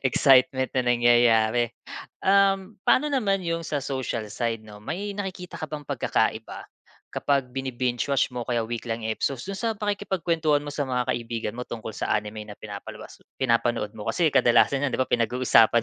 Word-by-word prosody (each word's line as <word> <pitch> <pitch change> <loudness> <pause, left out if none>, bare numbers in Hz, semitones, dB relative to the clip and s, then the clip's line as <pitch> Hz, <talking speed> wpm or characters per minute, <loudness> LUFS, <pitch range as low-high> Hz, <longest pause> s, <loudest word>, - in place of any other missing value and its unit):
excitement 130 0 +4
na 130 - +2
nangyayari. 120 -1 +4 0.6
Um, 195 0 +3
paano 295 +1 +4
naman 195 -8 +1
'yong 165 0 -1
sa 145 -3 -3
social 130 -5 -3
side 115 -2 -2
'no, 105 -1 -12
may 195 - -4
nakikita 190 -3 -6
ka 155 - -4
bang 150 -1 -6
pagkakaiba, - - -1 0.5
kapag 135 -3 0
bini-binge-watch 130 0 -1
mo, 125 - -4
kaya 120 -2 0
week 120 +1 -5
lang 115 0 -3
episodes, 120 +3 -2
do'n 195 - -5
sa 225 -2 -1
pakikipagkuwentuhan 170 -7 0
mo 145 - -6
sa 145 0 -1
mga 125 0 0
kaibigan 115 -2 -4
mo - - -5
tungkol 110 -1 -7
sa - - -3
anime 105 0 -2
na 105 - -9
pinapalabas 100 -2 -9 0.2
pinapanood 115 -4 +1
mo, 105 - -6
kasi 165 -4 +2
kadalasan 120 +3 +4
niyan, 135 - 0
'di - - -3
ba, - - +4
pinag-uusapan 120 -1 +4
130 Hz, 165 wpm, -25 LUFS, 115-165 Hz, 0.6 s, excitement